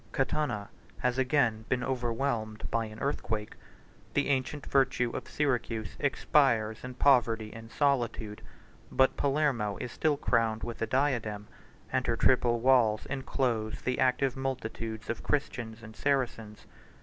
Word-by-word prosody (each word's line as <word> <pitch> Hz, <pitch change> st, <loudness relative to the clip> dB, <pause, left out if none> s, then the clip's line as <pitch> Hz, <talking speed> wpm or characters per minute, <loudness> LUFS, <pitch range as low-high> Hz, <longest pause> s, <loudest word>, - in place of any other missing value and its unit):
134 135 Hz, -, +3 dB, 0.2 s
Catana 105 Hz, -9 st, -2 dB, 0.4 s
has 125 Hz, +1 st, +1 dB
again 125 Hz, -5 st, +2 dB
been 125 Hz, -1 st, +1 dB
overwhelmed 120 Hz, -3 st, -2 dB
by 115 Hz, -1 st, +1 dB
an 110 Hz, 0 st, -9 dB
earthquake: 110 Hz, -5 st, -2 dB, 0.6 s
the 145 Hz, -, +2 dB
ancient 135 Hz, +1 st, -1 dB
virtue 130 Hz, -3 st, +2 dB
of -, -, -5 dB
Syracuse 120 Hz, -6 st, -1 dB
expires 120 Hz, -6 st, +2 dB
in 125 Hz, 0 st, -7 dB
poverty 115 Hz, -5 st, +3 dB
and 115 Hz, 0 st, -10 dB
solitude; 120 Hz, -7 st, 0 dB, 0.5 s
135 -, -, -13 dB
but 130 Hz, 0 st, +5 dB
Palermo 135 Hz, -8 st, +1 dB
is 125 Hz, -, -4 dB
still 150 Hz, +1 st, +1 dB
crowned 115 Hz, -5 st, +1 dB
with 120 Hz, -1 st, -5 dB
a 115 Hz, -, +1 dB
diadem, 115 Hz, -7 st, 0 dB, 0.5 s
and 130 Hz, -1 st, +1 dB
her 115 Hz, -1 st, +1 dB
triple 120 Hz, -2 st, +3 dB
walls 120 Hz, -4 st, +4 dB
enclose 125 Hz, -5 st, -1 dB
the 125 Hz, -, -1 dB
active 130 Hz, 0 st, +2 dB
multitudes 115 Hz, -4 st, -4 dB
of 115 Hz, -, -3 dB
Christians 120 Hz, -6 st, -2 dB
and 110 Hz, -1 st, -11 dB
Saracens. 120 Hz, -6 st, -1 dB
125 Hz, 140 wpm, -30 LUFS, 110-135 Hz, 0.6 s, but